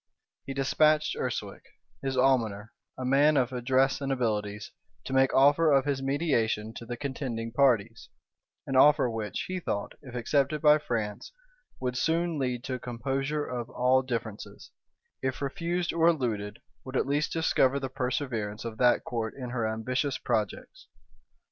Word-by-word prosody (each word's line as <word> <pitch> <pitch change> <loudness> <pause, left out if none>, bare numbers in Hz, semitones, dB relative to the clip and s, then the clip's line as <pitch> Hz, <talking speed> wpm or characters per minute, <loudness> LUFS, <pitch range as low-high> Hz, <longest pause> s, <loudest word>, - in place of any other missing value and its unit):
He 135 - -4
despatched 150 +3 +2
Urswic, - - -4 0.4
his 135 -1 -2
almoner, 115 -5 +1 0.3
a 130 - -4
man 145 +3 +4
of 130 -1 +1
address 130 +3 +1
and 135 0 -2
abilities, 105 -5 -2 0.3
to 135 - -6
make 135 0 +4
offer 145 +4 +5
of 135 -1 +4
his 140 -2 -1
mediation 130 -7 0
to 115 - -9
the 120 0 -5
contending 125 -5 -4
parties; 115 -4 +1 0.6
an 135 - -3
offer 130 -2 +5
which, 110 -3 -3
he 185 0 -3
thought, 100 - -3
if 130 -3 -11
accepted 140 +5 +1
by 150 0 +6
France, 110 -7 -4 0.5
would 125 -1 -2
soon 165 +3 0
lead 125 -2 -2
to 130 - -4
a 125 - -3
composure 135 +5 -2
of 120 -1 -5
all 130 +1 +3
differences; 115 -5 -6 0.5
if 130 0 -2
refused 170 +4 -2
or 165 0 +3
eluded, 115 -11 -1 0.2
would 130 0 -4
at - - +1
least 145 +2 0
discover 140 -4 +2
the 135 - -3
perseverance 125 -5 -3
of 110 -1 -6
that 125 -1 +4
court 115 -2 -3
in 125 -3 -6
her 120 -3 -1
ambitious 130 +5 -1
projects. - - -3
130 Hz, 155 wpm, -28 LUFS, 115-140 Hz, 0.6 s, by